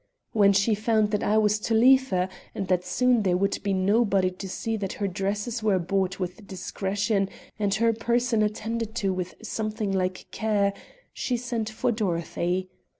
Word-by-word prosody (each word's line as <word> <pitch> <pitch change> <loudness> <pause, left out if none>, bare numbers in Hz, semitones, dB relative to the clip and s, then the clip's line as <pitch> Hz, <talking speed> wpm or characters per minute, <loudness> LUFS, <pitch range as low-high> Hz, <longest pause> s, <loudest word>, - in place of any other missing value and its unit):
When 200 -2 +5
she 200 +3 +3
found 215 0 +1
that 210 - 0
I 215 +1 +2
was 210 -1 +3
to 225 +1 0
leave 260 +3 +6
her 180 0 +1 0.3
and 195 - -3
that 180 -1 +2
soon 245 +6 +2
there 185 -3 +2
would 200 +2 0
be 200 - -1
nobody 195 0 +2
to 190 +1 -8
see 225 +4 -2
that 195 -3 -3
her 200 - -2
dresses 205 +5 -2
were 210 -3 +3
bought 190 +1 -1
with 185 +3 -5
discretion, 195 +2 -1 0.3
and 205 -1 +1
her 230 +2 +3
person 235 0 +1
attended 220 +1 -2
to 200 -5 0
with 185 -1 -4
something 215 -1 -2
like 185 -1 -1
care, 205 -2 +1 0.4
she 250 - -1
sent 235 -2 -3
for 240 +3 0
Dorothy. 180 -2 -1
205 Hz, 175 wpm, -26 LUFS, 190-225 Hz, 0.4 s, leave